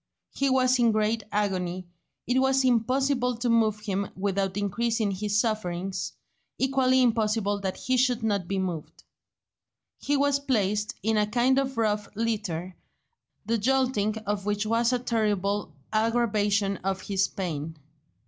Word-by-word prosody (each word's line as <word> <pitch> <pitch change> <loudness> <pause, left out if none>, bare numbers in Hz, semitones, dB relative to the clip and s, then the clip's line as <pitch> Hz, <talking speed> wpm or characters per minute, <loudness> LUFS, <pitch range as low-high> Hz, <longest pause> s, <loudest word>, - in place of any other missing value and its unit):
He 275 0 +1
was 255 -1 +3
in 235 -1 +4
great 215 +1 +1
agony; 185 -3 -1 0.4
it 250 +1 +2
was 265 0 +3
impossible 250 +1 +1
to 240 +1 -1
move 220 -2 +2
him 200 -2 -2
without 195 0 -1
increasing 220 +1 0
his 205 +2 0
sufferings, 195 -4 -2 0.4
equally 260 -1 +3
impossible 215 -3 +1
that 190 -2 -3
he 255 0 0
should 250 -2 +2
not 200 -5 0
be 195 - -2
moved. 180 -5 -4 1.0
He 290 0 0
was 280 0 +2
placed 210 -6 0
in 220 +1 +1
a 210 0 +2
kind 245 +4 +2
of 270 -2 -2
rough 210 -2 0
litter, 200 -6 -2 0.7
the 230 +1 0
jolting 245 -3 +1
of 205 -1 -2
which 205 0 0
was 230 +2 +2
a 250 - +2
terrible 205 -5 -1 0.2
aggravation 210 -3 +1
of 190 0 -3
his 195 -1 0
pain. 160 -4 -5
215 Hz, 140 wpm, -27 LUFS, 200-245 Hz, 1.0 s, in